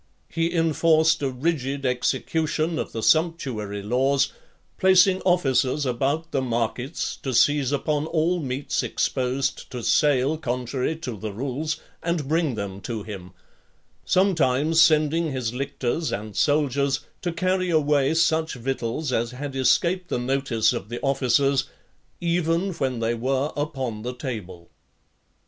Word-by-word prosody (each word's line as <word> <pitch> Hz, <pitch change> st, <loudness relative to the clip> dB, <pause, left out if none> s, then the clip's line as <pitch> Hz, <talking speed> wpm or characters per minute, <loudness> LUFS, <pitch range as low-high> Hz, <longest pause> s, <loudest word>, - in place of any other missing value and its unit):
He 165 Hz, +1 st, -1 dB
enforced 160 Hz, -1 st, +3 dB
a 140 Hz, -, 0 dB
rigid 140 Hz, 0 st, -2 dB
execution 155 Hz, +5 st, 0 dB
of -, -, -4 dB
the 115 Hz, -, -4 dB
sumptuary 130 Hz, -, +1 dB
laws; 135 Hz, +5 st, +1 dB, 0.5 s
placing 190 Hz, 0 st, +5 dB
officers 145 Hz, -5 st, +2 dB
about 140 Hz, +6 st, -1 dB
the 135 Hz, -, 0 dB
markets, 120 Hz, +1 st, -2 dB
to 130 Hz, -3 st, -4 dB
seize 145 Hz, +1 st, +3 dB
upon 145 Hz, +2 st, 0 dB
all 165 Hz, +2 st, +1 dB
meats 135 Hz, -2 st, -2 dB
exposed 130 Hz, +1 st, -1 dB
to 125 Hz, -3 st, -6 dB
sale 145 Hz, +3 st, +2 dB
contrary 125 Hz, +1 st, -2 dB
to 140 Hz, -8 st, -6 dB
the 105 Hz, +1 st, -5 dB
rules, 135 Hz, +8 st, -3 dB, 0.2 s
and 170 Hz, -5 st, -1 dB
bring 160 Hz, -4 st, +1 dB
them 100 Hz, -2 st, -5 dB
to 110 Hz, -1 st, -4 dB
him; 95 Hz, -4 st, -9 dB, 0.7 s
sometimes 165 Hz, -4 st, +3 dB
sending 155 Hz, 0 st, +3 dB
his 125 Hz, -3 st, -2 dB
lictors 140 Hz, +3 st, -2 dB
and 105 Hz, 0 st, -5 dB
soldiers 140 Hz, -2 st, +1 dB, 0.2 s
to 175 Hz, -, -1 dB
(30) 165 Hz, -, -6 dB
carry 185 Hz, +1 st, 0 dB
away 150 Hz, -2 st, +2 dB
such 160 Hz, -1 st, +2 dB
victuals 130 Hz, +2 st, -3 dB
as 115 Hz, +1 st, 0 dB
had 135 Hz, +1 st, -6 dB
escaped 175 Hz, +7 st, +2 dB
the -, -, 0 dB
notice 125 Hz, -2 st, +1 dB
of 100 Hz, -, -5 dB
the 120 Hz, -, -4 dB
officers, 135 Hz, 0 st, +2 dB, 0.5 s
even 170 Hz, +2 st, 0 dB
when 130 Hz, -6 st, -2 dB
they 115 Hz, +1 st, +1 dB
were 135 Hz, +5 st, -1 dB
upon 135 Hz, -7 st, -3 dB
the 125 Hz, +2 st, -5 dB
table. 95 Hz, -, -7 dB
140 Hz, 135 wpm, -24 LUFS, 125-160 Hz, 0.7 s, placing